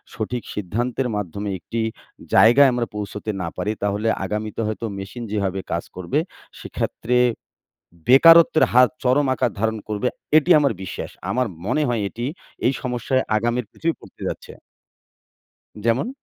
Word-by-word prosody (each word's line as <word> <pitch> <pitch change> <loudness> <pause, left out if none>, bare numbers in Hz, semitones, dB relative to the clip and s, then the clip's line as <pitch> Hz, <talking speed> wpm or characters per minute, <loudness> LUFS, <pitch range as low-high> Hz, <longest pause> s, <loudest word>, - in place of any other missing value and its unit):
সঠিক 120 +2 -3
সিদ্ধান্তের 120 +6 -2
মাধ্যমে 100 +1 -4
একটি 115 +8 -4 0.5
জায়গায় 130 +5 +7
আমরা 120 -1 -1
পৌঁছতে 105 +1 -5
না 85 - -2
পারি 105 - -1
তাহলে 105 +2 0 0.2
আগামীতে 105 +2 -3
হয়তো 110 +1 -3
মেশিন 95 +5 -7
যেভাবে 100 -2 -1
কাজ 85 - -1
করবে 95 - -1 0.4
সেক্ষেত্রে 125 +2 -2 0.9
বেকারত্বের 165 +4 +7
হাত 125 0 +6
চরম 135 +3 +3
আকার 125 - 0
ধারণ 110 +1 0
করবে। 105 +3 -1 0.3
এটি 155 +3 +2
আমার 140 -5 +2
বিশ্বাস। 95 - -6 0.2
আমার 125 0 +1 0.2
মনে 125 +8 +1
হয় 120 -3 0
এটি 120 +3 -5 0.4
এই 125 - +3
সমস্যায় 125 +1 0
আগামির 120 +2 -1
পৃথিবী 165 0 -1
পড়তে - - -17
যাচ্ছে। - - -6 1.3
যেমন? 115 - +1
115 Hz, 135 wpm, -22 LUFS, 105-125 Hz, 1.3 s, জায়গায়